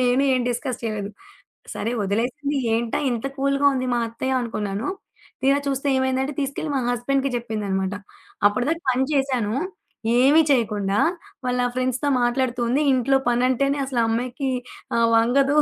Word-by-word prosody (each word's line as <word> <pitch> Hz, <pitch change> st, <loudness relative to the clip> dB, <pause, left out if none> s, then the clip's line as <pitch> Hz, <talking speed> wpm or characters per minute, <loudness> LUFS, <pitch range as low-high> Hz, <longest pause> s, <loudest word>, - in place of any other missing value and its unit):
నేను 250 Hz, +2 st, +3 dB
ఏం 255 Hz, -, +1 dB
డిస్కస్ 250 Hz, +1 st, -3 dB
చేయలేదు. 210 Hz, -2 st, -3 dB, 0.6 s
సరే 225 Hz, -, -2 dB
వదిలేసింది 255 Hz, +9 st, -1 dB, 0.2 s
ఏంటా? 230 Hz, 0 st, -1 dB
ఇంత 235 Hz, +2 st, -2 dB
కూల్‌గా 275 Hz, +1 st, +2 dB
ఉంది 255 Hz, 0 st, -1 dB
మా -, -, +1 dB
అత్తయ్య 260 Hz, +3 st, -1 dB
అనుకున్నాను. 210 Hz, -2 st, -3 dB, 0.5 s
తీరా 275 Hz, +1 st, +4 dB
చూస్తే 275 Hz, +1 st, -1 dB
ఏమైందంటే, 260 Hz, +2 st, 0 dB
తీసుకెళ్ళి 280 Hz, +2 st, -3 dB
మా 265 Hz, -, +1 dB
హస్బండ్‌కి 270 Hz, +3 st, 0 dB
చెప్పిందనమాట. 200 Hz, -4 st, -2 dB, 0.5 s
అప్పటి‌దాకా 265 Hz, +11 st, +1 dB
పని 260 Hz, +1 st, +1 dB
చేశాను, 260 Hz, -6 st, +1 dB, 0.7 s
"ఏమీ 290 Hz, +5 st, +6 dB
చేయకుండా 210 Hz, -6 st, +1 dB, 0.5 s
వాళ్ళ 250 Hz, 0 st, 0 dB, 0.2 s
ఫ్రెండ్స్‌తో 255 Hz, +2 st, 0 dB
మాట్లాడుతూంది. 245 Hz, +2 st, +1 dB
ఇంట్లో 265 Hz, +1 st, +3 dB
పనంటేనే 260 Hz, +3 st, +2 dB
అసలు 255 Hz, -3 st, -1 dB
ఆ -, -, +1 dB
అమ్మాయికి 255 Hz, +4 st, -2 dB, 0.5 s
ఆహ్, 230 Hz, 0 st, +4 dB
వంగదు. 270 Hz, +5 st, +3 dB
255 Hz, 135 wpm, -23 LUFS, 230-275 Hz, 0.7 s, ఏమీ